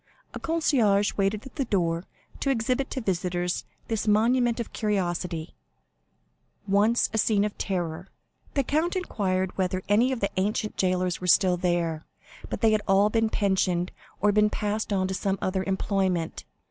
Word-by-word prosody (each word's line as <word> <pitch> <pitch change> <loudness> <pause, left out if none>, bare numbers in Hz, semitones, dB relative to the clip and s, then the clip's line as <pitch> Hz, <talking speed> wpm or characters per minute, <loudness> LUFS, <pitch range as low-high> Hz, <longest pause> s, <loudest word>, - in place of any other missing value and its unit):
A - - -5
concierge 240 -12 +2
waited 200 +4 0
at 265 - -12
the 275 - 0
door 170 -5 0 0.3
to 275 - -1
exhibit 255 +1 0
to 260 - -3
visitors 180 -3 -1 0.2
this 225 -1 -2
monument 235 +3 +3
of 235 - -5
curiosity, 175 -5 -2 1.1
once 210 +4 +3
a 220 - +1
scene 210 -1 +3
of 210 - -4
terror. 175 -2 -3 0.5
The 275 - +2
count 315 +7 0
inquired 190 - -1
whether 185 0 0
any 225 +6 +3
of 260 - -2
the 200 - -1
ancient 210 +2 -1
jailers 185 -1 0
were 180 - -3
still 180 0 +5
there; 170 -3 -1 0.4
but - - -4
they 225 -2 +5
had 215 -1 +2
all 200 +2 +4
been 225 0 +2
pensioned, 190 -4 +1 0.3
or 210 +1 +4
had 210 +1 +3
passed 210 +1 -2
on 190 -2 +1
to 190 - -3
some 195 +1 -1
other 190 0 -1
employment. 190 -3 -1
200 Hz, 160 wpm, -26 LUFS, 185-220 Hz, 1.1 s, still